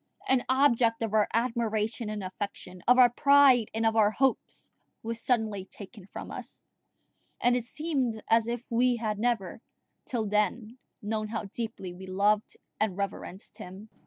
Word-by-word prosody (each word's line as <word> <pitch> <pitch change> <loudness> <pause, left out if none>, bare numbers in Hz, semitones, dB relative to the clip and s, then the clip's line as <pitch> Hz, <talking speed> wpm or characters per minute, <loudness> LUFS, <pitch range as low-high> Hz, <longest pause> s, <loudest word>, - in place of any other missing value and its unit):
An 260 -1 +3
object 240 -4 +3
of 220 -2 -3
our 215 -1 +4
admiration 230 -1 -1
and 210 -2 -4
affection, 185 -1 -7
of 250 +1 +6
our 245 -2 +7
pride 275 -3 +5
and 225 +1 -1
of 225 0 +2
our 215 -2 +5
hopes, 260 +4 -1 0.4
was 230 0 -4
suddenly 220 -6 0
taken 200 0 -12
from - - -8
us; - - -8 0.8
and 245 +1 +3
it 245 -2 -1
seemed 265 -5 -2
as 225 0 +3
if 240 0 -3
we 245 +1 +3
had 215 -3 -3
never 225 -5 -1 0.5
till 235 -4 -2
then 210 +3 -1 0.2
known 215 +1 -2
how 220 0 -4
deeply 220 -6 -5
we 190 +2 -10
loved 205 +3 +1 0.2
and 205 -4 0
reverenced 195 -1 -5
him. 190 +4 -10
225 Hz, 160 wpm, -28 LUFS, 210-240 Hz, 0.8 s, our